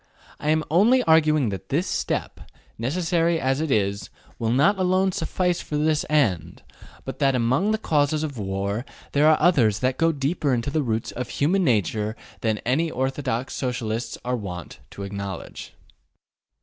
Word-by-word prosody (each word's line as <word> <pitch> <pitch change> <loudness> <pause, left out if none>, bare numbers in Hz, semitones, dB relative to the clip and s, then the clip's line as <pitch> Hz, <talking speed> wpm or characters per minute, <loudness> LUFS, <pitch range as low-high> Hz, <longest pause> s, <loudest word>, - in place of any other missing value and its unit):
I 150 - -2
am 155 0 +2
only 230 +10 +5
arguing 155 -5 +4
that 95 -1 -6
this 160 +7 +1
step, - - -3 0.3
necessary 165 +5 +1
as 135 +1 0
it 160 - -2
is, 100 - 0 0.3
will 115 - 0
not 145 - +3
alone 185 +1 +2
suffice 180 -1 -1
for 150 - -4
this 155 0 +1
end, 95 - 0 0.4
but - - -6
that 135 -1 +3
among 125 - +2
the 220 - +2
causes 150 -5 +1
of 140 -6 -4
war 100 +3 -2 0.3
there 150 +2 +4
are 155 - +5
others 130 - +4
that 130 0 0
go 165 0 +4
deeper 145 -1 0
into 120 +4 -2
the 155 - +1
roots 115 -4 -2
of 125 - -5
human 185 +7 +1
nature 110 - 0 0.2
than 110 -2 0
any 140 +8 +2
that - - -9
orthodox 130 -1 -2
Socialists 120 -3 -3
are 125 0 0
wont 90 -7 -7
to 100 - -8
acknowledge. 100 -2 -7
135 Hz, 165 wpm, -24 LUFS, 110-160 Hz, 0.4 s, only